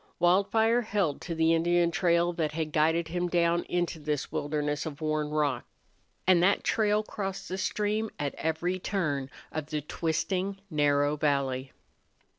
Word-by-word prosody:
Wildfire 200 +7 +3
held 200 -10 -1
to 170 - -4
the 160 0 +3
Indian 170 +1 +2
trail 170 0 +2
that 160 -3 -1
had 155 -1 -2
guided 160 +2 +2
him 175 +1 -1
down 170 0 +2
into 175 -2 -1
this 150 -1 -2
wilderness 150 +1 -2
of 145 -2 -7
worn 155 -1 -1
rock. 150 -5 0 0.6
And 180 -2 +5
that 195 +3 +3
trail 215 -1 +2
crossed 195 -3 -5
the 185 - -4
stream 215 +2 -1
at 145 -1 -2
every 170 +3 -1
turn 150 -9 -1 0.2
of 155 -2 -4
the 150 -1 -2
twisting, 180 +6 -2
narrow 145 -1 +2
valley. 135 -3 0
165 Hz, 150 wpm, -29 LUFS, 150-185 Hz, 0.6 s, And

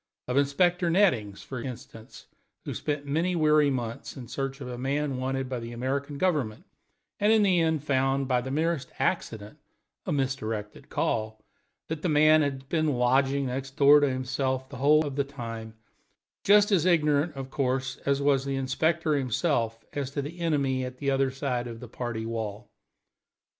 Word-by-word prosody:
Of 125 - -2
Inspector 175 +6 +2
Nettings, 125 - +2
for 130 -3 -6
instance, 115 -3 -9 0.4
who - - -4
spent 145 -1 -3
many 165 +6 0
weary 155 -2 +4
months 120 -3 -4
in 125 - -7
a - - -15
search 135 +2 -4
for 135 -3 -8
a 125 - -5
man 135 +2 -1
wanted 135 +1 -2
by 125 -1 -3
the 115 0 -7
American 140 +4 -3
Government, 145 -11 -1 0.5
and 210 +2 +3
in 220 -1 +5
the 185 -3 +3
end 160 -3 +1
found, 135 -1 +1
by 125 -1 +2
the 130 - -6
merest 155 -1 -1
accident 105 -1 -2 0.5
(a - - 0
misdirected 115 -7 -3
call), 110 -1 -1 0.5
that 160 -1 -4
the 180 - 0
man 155 +1 +5
had 135 -2 -2
been 155 -1 +1
lodging 135 +3 +2
next 135 +1 -5
door 145 +1 +7
to 145 -1 +2
himself 130 0 -2
the 140 - -8
whole 150 +4 +4
of 140 -1 -5
the 140 - +2
time; 115 -5 -7 0.7
just 205 +1 +5
as 185 -3 +3
ignorant, 150 -2 +2
of 135 -1 -7
course, 130 -2 -1
as 140 0 -1
was 140 -2 +3
the 135 0 -2
inspector 155 +4 0
himself 125 -4 0
as 140 -2 -3
to 140 0 -3
the 165 +5 -8
enemy 140 -6 0
at 125 0 -6
the 140 +1 -1
other 135 0 +2
side 130 -2 -2
of 115 -1 -8
the 125 - -9
party 120 -1 -4
wall. 110 -1 -5
135 Hz, 180 wpm, -27 LUFS, 125-150 Hz, 0.7 s, door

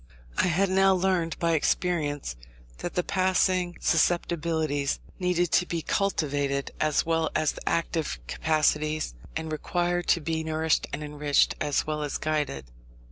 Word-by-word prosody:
I - - +2
had 185 +3 +2
now 190 0 +5
learnt 180 -3 0
by 170 -1 +1
experience 150 - 0 0.4
that 175 - -5
the 180 - +1
passing 185 -1 +1
susceptibilities 160 -4 +1 0.2
needed 175 -2 +1
to 180 - +3
be 165 -2 -3
cultivated 145 -7 0
as 155 -1 +2
well 165 -1 +1
as 155 -1 +2
the - - -5
active 165 -1 -1
capacities, 155 - 0 0.2
and 160 -1 -3
required 175 +3 -1
to 170 - +4
be 160 0 -2
nourished 160 0 +1
and 145 +2 -4
enriched 150 -1 +2
as 145 - +1
well 150 0 -2
as 145 -2 -2
guided. 150 - -2
160 Hz, 140 wpm, -27 LUFS, 150-175 Hz, 0.4 s, now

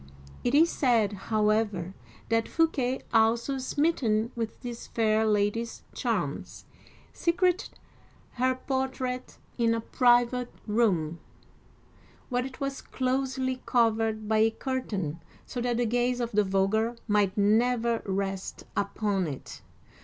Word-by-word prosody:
It 245 +3 +2
is 330 +3 +5
said, 230 -6 +2 0.2
however, 210 -4 +1 0.4
that 225 0 +2
Fouquet, 270 -6 +1
also 230 +4 +3
smitten 255 -6 +1
with 225 -2 -4
this 240 -1 -6
fair 220 -1 +2
lady's 210 +2 0
charms, - - -3 0.5
secreted 355 +2 0 0.5
her 255 +1 +1
portrait 260 -1 -3 0.2
in 230 -1 +3
a - - -1
private 245 +1 +3
room, 185 -8 +1 1.1
where 250 -1 0
it 260 - -12
was 275 -1 -3
closely 260 0 -1
covered 225 -3 +2
by 220 0 +2
a 220 +1 +5
curtain, 210 - -3 0.2
so 245 - -5
that 240 -1 0
the 245 - +1
gaze 245 +2 +1
of 240 -1 -2
the 210 0 +3
vulgar 200 +4 +1
might 205 -2 +2
never 230 +3 +2
rest 195 -1 -3
upon 200 -2 0
it. 140 -3 -7
230 Hz, 120 wpm, -28 LUFS, 215-255 Hz, 1.1 s, is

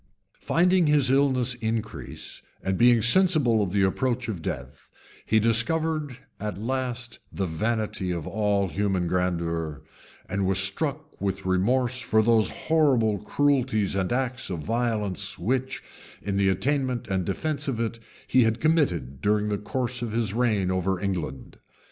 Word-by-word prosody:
Finding 180 0 +3
his 145 -3 +3
illness 130 -3 +2
increase, 110 -2 -5 0.2
and 95 0 0
being 120 0 +5
sensible 140 - +5
of 95 -3 -1
the 100 0 +2
approach 125 +5 0
of 95 -7 -4
death, 65 -1 -6 0.4
he 110 - +4
discovered 145 +5 +1 0.2
at 105 -3 -4
last 125 +1 -3
the 95 - -2
vanity 105 +2 -2
of 85 -4 -3
all 105 -2 0
human 95 -2 0
grandeur, 85 -4 -2 0.4
and 95 0 -1
was 95 0 +1
struck 145 +11 -2
with 100 -1 -2
remorse 120 +7 +1
for 110 -2 +2
those 110 -1 +3
horrible 130 -10 +2
cruelties 130 -4 +1
and 95 0 -1
acts 130 0 -2
of 85 -4 -4
violence, 110 -4 -1
which, 130 - -2 0.4
in 100 -1 -2
the 100 -1 +3
attainment 130 +3 -1
and 95 -3 -1
defence 145 - -2
of 125 -5 -2
it, 115 0 -2 0.3
he 130 - +3
had 115 0 +2
committed 90 - +1
during 105 0 +1
the 105 - 0
course 125 +3 -2
of 115 -3 -3
his 110 -4 0
reign 105 -6 +1
over 95 0 0
England. 90 -9 -4
110 Hz, 150 wpm, -26 LUFS, 95-130 Hz, 0.4 s, being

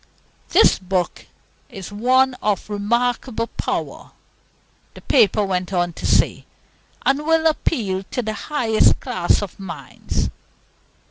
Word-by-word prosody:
"This - - +5
book 185 -1 -2 0.4
is 195 0 -9
one 255 +5 +3
of 210 0 -1
remarkable 235 +3 0
power," - - -4 0.9
the - - -11
paper 215 -5 +3
went 185 -1 -2
on 175 -2 0
to - - -4
say, - - +2 0.6
"and 275 +1 +3
will 325 +1 +2
appeal 230 - 0
to 250 - -2
the 215 0 -3
highest 230 -4 +2
class 180 +3 0
of 200 - -8
minds. 165 -9 -4
210 Hz, 120 wpm, -21 LUFS, 190-250 Hz, 0.9 s, This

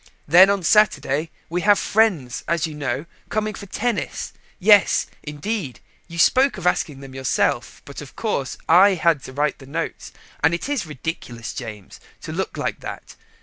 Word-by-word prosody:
Then 180 +6 +8
on 200 -2 0
Saturday 165 -5 +3 0.2
we 175 +2 -2
have 205 +2 +5
friends, 190 - +1
as 170 -2 +1
you 160 - -6
know, 145 -1 -3 0.2
coming 215 0 -1
for 200 - -9
tennis. 230 +3 -3 0.2
Yes, 205 +1 +5 0.2
indeed, 150 - -4 0.3
you 170 -1 -9
spoke 260 +8 +4
of 185 - -7
asking 150 -5 0
them 135 -1 -10
yourself, 130 -1 -1
but, 140 - -9
of 145 - -12
course, 140 - -2
I 190 +4 +6
had 165 -4 +2
to 130 - -9
write 145 +2 -1
the 135 - -13
notes, 165 +4 -5 0.3
and 160 +3 +4
it 170 - -5
is 280 - -2
ridiculous, 130 -5 -6
James, 105 -6 -8 0.2
to - - -6
look - - -3
like - - -2
that. - - -8
165 Hz, 170 wpm, -22 LUFS, 140-200 Hz, 0.3 s, Then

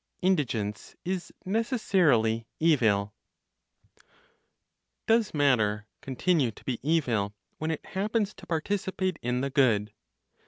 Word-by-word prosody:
INDIGENCE 120 - 0
IS 185 0 -3
NECESSARILY 180 - +2
EVIL. 110 -11 +3 1.9
Does 225 -2 +3
matter 110 -8 +2 0.2
continue 135 +1 +1
to 110 - -13
be 125 -3 -2
evil 120 -10 +1 0.2
when 155 - -2
it 160 - -3
happens 210 +1 -1
to 195 - -14
participate 185 +2 -1
in 125 +1 -1
the 140 0 -2
good? 115 -7 +2
145 Hz, 105 wpm, -28 LUFS, 115-185 Hz, 1.9 s, EVIL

